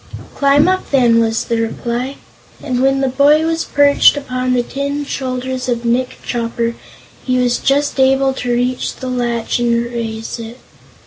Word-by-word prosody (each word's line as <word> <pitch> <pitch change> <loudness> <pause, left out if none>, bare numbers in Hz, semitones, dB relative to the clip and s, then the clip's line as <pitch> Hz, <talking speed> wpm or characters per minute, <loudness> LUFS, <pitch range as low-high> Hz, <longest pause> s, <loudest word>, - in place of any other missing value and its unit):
"Climb 285 +2 +3
up, 375 0 0
then," 240 -4 +4
was 225 -1 +1
the 230 -1 -1
reply, 240 +4 -3 0.5
and 255 -4 -1
when 270 0 +2
the 270 - +1
boy 290 +4 +3
was 325 0 0
perched 285 0 +4
upon 255 -2 -2
the 245 -1 +1
tin 280 +3 -3
shoulders 255 -1 -4
of 240 -1 -2
Nick 250 +2 0
Chopper, 235 -1 -2 0.5
he 255 -1 0
was 245 -1 +1
just 285 0 0
able 270 0 +3
to 250 -2 -3
reach 245 +1 -1
the 255 - -6
latch 240 -2 -1
and 235 -1 +1
raise 225 -1 -5
it. 230 +1 -8
255 Hz, 165 wpm, -16 LUFS, 235-275 Hz, 0.5 s, then